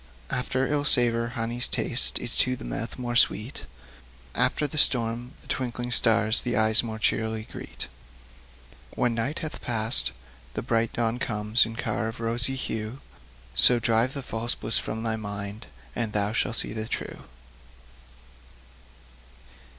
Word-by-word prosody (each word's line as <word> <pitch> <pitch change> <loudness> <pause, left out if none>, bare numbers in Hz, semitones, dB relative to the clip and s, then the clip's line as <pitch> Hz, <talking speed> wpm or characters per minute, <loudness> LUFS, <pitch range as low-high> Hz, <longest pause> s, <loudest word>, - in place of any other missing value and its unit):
After 130 +1 -1
ill 145 0 -1
savour, 120 -4 +3
honey's 120 +2 -1
taste 125 - +4
Is 120 - +3
to 125 0 +4
the - - -11
mouth 115 - -5
more 120 -2 -4
sweet; 120 +2 +2 0.7
After 125 +4 +1
the 150 +1 -3
storm, 120 0 +3
the - - -20
twinkling 120 -1 -4
stars 110 -1 +6
The 120 -4 -1
eyes 110 0 +5
more 110 -2 -6
cheerly 110 0 -1
greet. - - -6 1.1
When 120 -1 0
night 125 +7 -3
hath 155 - -8
past, 115 0 -1 0.4
the - - -4
bright 115 -1 0
dawn 120 0 -1
comes 105 -1 +1
In 115 - -8
car 110 -1 -3
of 115 - -7
rosy 115 +3 -1
hue; 110 -1 -5 0.5
So 125 - +6
drive 115 +3 +1
the 140 - -5
false 115 0 -3
bliss 115 - 0
from 110 +1 -5
thy 110 -1 -1
mind, 100 +1 -7 0.3
And 115 -3 -3
thou 105 0 +1
shall 120 - -1
see 115 - -1
the 110 0 -3
true. - - -6
115 Hz, 150 wpm, -25 LUFS, 110-125 Hz, 1.1 s, stars